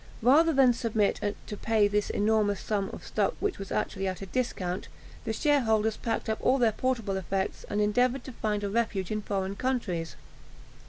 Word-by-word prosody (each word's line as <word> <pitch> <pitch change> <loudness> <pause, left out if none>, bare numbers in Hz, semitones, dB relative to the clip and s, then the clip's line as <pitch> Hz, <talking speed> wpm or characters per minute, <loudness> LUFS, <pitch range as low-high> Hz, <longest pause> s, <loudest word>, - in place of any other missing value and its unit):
Rather 305 +7 +6
than 265 -4 +5
submit 220 -3 0 0.3
to 210 - -6
pay 220 -2 +3
this 210 0 0
enormous 210 -1 +2
sum 200 -2 -1
for - - -7
stock - - 0
which 410 -2 -1
was 195 - -7
actually 195 0 -1
at 185 -1 -3
a - - -4
discount, 185 -5 -2 0.4
the 225 - -1
shareholders 220 -5 +2
packed 230 -1 -3
up 220 0 -1
all 265 - +3
their 235 -4 +3
portable 225 -4 -1
effects, 190 +2 -2
and 205 - -1
endeavoured 245 +5 +2
to - - -8
find 210 -3 -2
a 200 - -1
refuge 215 -4 -1
in 215 0 -1
foreign 195 -1 -2
countries. 200 -10 -2
215 Hz, 180 wpm, -28 LUFS, 200-245 Hz, 0.4 s, Rather